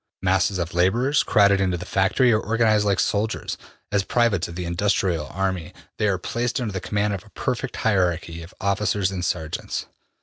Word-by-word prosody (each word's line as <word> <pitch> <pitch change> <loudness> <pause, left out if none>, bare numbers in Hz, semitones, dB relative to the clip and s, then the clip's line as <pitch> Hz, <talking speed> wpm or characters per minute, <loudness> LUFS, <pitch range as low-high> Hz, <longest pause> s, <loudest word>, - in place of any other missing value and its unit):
Masses 95 +1 +2
of 85 -1 -3
laborers, 115 +12 +2
crowded 100 -2 +4
into 90 -2 +1
the 90 - -7
factory, 105 +6 +2
are 110 - +3
organized 110 -2 +2
like 100 -2 +2
soldiers. 105 +2 -1 0.4
As 100 -1 +2
privates 115 -6 +1
of 85 - -9
the 90 0 -4
industrial 85 -3 0
army 95 0 -3 0.2
they 105 - +2
are 100 -2 +1
placed 120 +7 -2
under 115 -5 -3
the 95 - -3
command 105 +1 0
of 95 -1 -5
a 110 - -18
perfect 125 +3 -3
hierarchy 90 -6 0
of 85 +2 -11
officers 100 0 0
and 90 -2 -4
sergeants. 80 -2 -3
100 Hz, 180 wpm, -23 LUFS, 90-110 Hz, 0.4 s, crowded